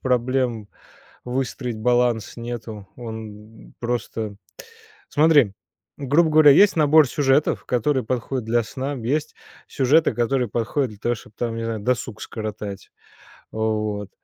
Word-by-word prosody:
проблем 125 -3 0 0.6
выстроить 125 -1 -3
баланс 120 -1 +1
нету. 115 -4 -7
Он 110 -2 -10
просто 115 -3 -3 0.7
Смотри, 145 -8 +4 0.4
грубо 145 +4 +2
говоря, 155 -1 +7
есть 200 +8 +6
набор 155 -1 +5
сюжетов 140 +2 +1
который 130 +2 0
подходит 125 +1 -3
для 115 +1 +1
сна, 130 +5 -4
есть 140 +4 -2 0.3
сюжеты 145 +4 +3
которые 125 +1 +1
подходят 120 +4 -1
для 105 - -12
того 120 +1 0
чтобы 110 -1 -15
там, 115 -1 -2
не 115 - -4
знаю, 115 -1 -3
досуг 120 -1 -2
скоротать, 105 -3 -6 0.6
вот, 105 -2 -2
120 Hz, 120 wpm, -22 LUFS, 110-135 Hz, 0.7 s, говоря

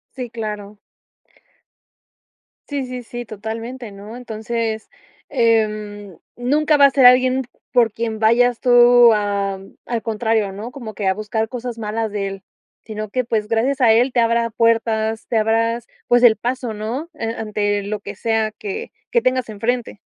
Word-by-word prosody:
Sí, 250 -2 -5
claro. 210 -3 -6 1.9
Sí, 280 -3 -3
sí, 250 -1 -6
sí, 240 +1 -7
totalmente, 225 +3 -6
¿no? 205 +4 -10
Entonces, 225 -1 -4 0.4
em, 215 - 0 0.2
nunca 295 +5 +2
va 280 - +7
a - - +7
ser 265 -1 +3
alguien 255 +1 +6 0.3
por 235 -3 +3
quien 225 -1 -3
vayas 235 +2 +3
tú 245 -1 +6
am, 200 -2 -2
al 235 -2 -2
contrario, 220 -2 0
¿no?, 215 +5 -7
como 230 -6 -8
que 200 -1 -2
a 190 - +3
buscar 215 +2 -2
cosas 245 -1 -6
malas 220 0 -3
de 200 -1 -2
él, 195 0 -7 0.4
sino 215 -1 -6
que, 255 +3 -1
pues, 220 -2 -1
gracias 240 +5 0
a 235 -3 +6
él 245 +4 +3
te 245 - +1
abra 230 0 +2
puertas, 225 -1 +1
te 230 - 0
abras, 230 +2 +1 0.2
pues, 245 0 +4
el 220 -3 +7
paso, 245 0 -3
¿no?, 230 +9 -4
eh, 225 -6 -4
ante 205 -2 -1
lo 210 +1 -4
que 205 0 -8
sea 225 0 0
que 210 -2 -6 0.2
que 235 - +3
tengas 255 -1 0
enfrente. 225 0 -3
225 Hz, 160 wpm, -20 LUFS, 215-245 Hz, 1.9 s, va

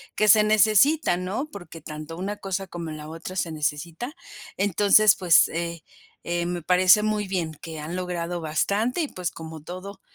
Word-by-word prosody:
que 215 - +2
se 210 +1 +7
necesita, 215 - +4
¿no?, 195 +12 -4
porque 175 - -10
tanto 155 +1 -8
una 200 +3 -3
cosa 195 -1 -4
como 170 -2 -6
la 155 0 -8
otra 165 +4 -8
se 165 -3 -2
necesita. 160 - -3 0.4
Entonces, 205 +2 +5
pues, 175 -2 +5
eh, 170 0 -4 0.4
eh, 175 0 -1
me 175 0 -3
parece 185 +4 +5
muy 210 -1 -1
bien 170 -4 -2
que 160 +1 -9
han 155 +4 -6
logrado 175 -1 -3
bastante, 200 - 0
y 315 - 0
pues, 180 - -4
como 160 -1 -9
todo 185 +4 -9
180 Hz, 170 wpm, -24 LUFS, 165-205 Hz, 0.4 s, se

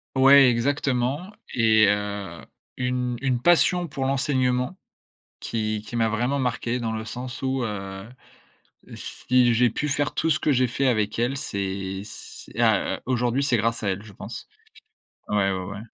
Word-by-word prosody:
Ouais 135 0 +7
exactement 135 - 0 0.2
et 110 -2 +5
heu, 105 -1 -2 0.4
une 125 -1 -1
une 130 -3 0
passion 175 +4 +3
pour 135 -2 -4
l'enseignement, 130 +1 0 0.6
qui 110 -2 -2
qui 120 - -6
m'a 115 -1 +2
vraiment 120 +6 0
marquée 125 -1 -1
dans 115 -1 -2
le 110 0 -4
sens 125 +3 -7
où, 130 -1 0
heu, 95 -2 -5 0.9
si 125 -1 +1
j'ai 120 +2 +4
pu 150 +6 -3
faire 145 +1 -1
tout 165 - 0
ce 155 - +3
que - - +1
j'ai 130 -2 +3
fait 135 +4 0
avec 110 -4 0
elle, 120 +4 0
c'est 95 -4 -3
c'est - - -11
a - - +2
heu, - - -16
aujourd'hui 125 +1 0
c'est 125 -4 +2
grâce 115 +2 0
à 100 - -1
elle 95 +1 -3
je 105 -2 -13
pense. - - -8 0.8
Ouais, 100 -2 +2
ouais, 95 -1 -3
ouais. 100 +1 -7
120 Hz, 165 wpm, -24 LUFS, 110-135 Hz, 0.9 s, Ouais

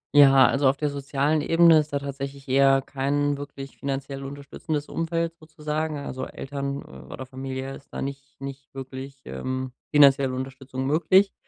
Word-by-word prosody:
Ja, 135 -2 +8
also 135 0 +2
auf 135 - +4
der 150 +1 -1
sozialen 140 +2 0
Ebene 165 +1 +6
ist 150 0 -3
da 140 - +1
tatsächlich 140 0 -6
eher 135 0 +5
kein 145 +2 0
wirklich 140 -1 -8
finanziell 135 0 -4
unterstützendes 145 +2 -5
Umfeld 165 0 -2
sozusagen. 155 -1 -3
Also, 130 -2 -5
Eltern 140 0 -5
oder 65 - -9
Familie 130 +1 -5
ist 140 - -16
da - - -4
nicht 140 0 -7
nicht 135 0 -8
wirklich, 135 0 -8
ähm, 130 0 -4 0.2
finanzielle 140 -3 +5
Unterstützung 130 0 -5
möglich. 175 +7 +4
140 Hz, 150 wpm, -25 LUFS, 135-145 Hz, 0.2 s, Ja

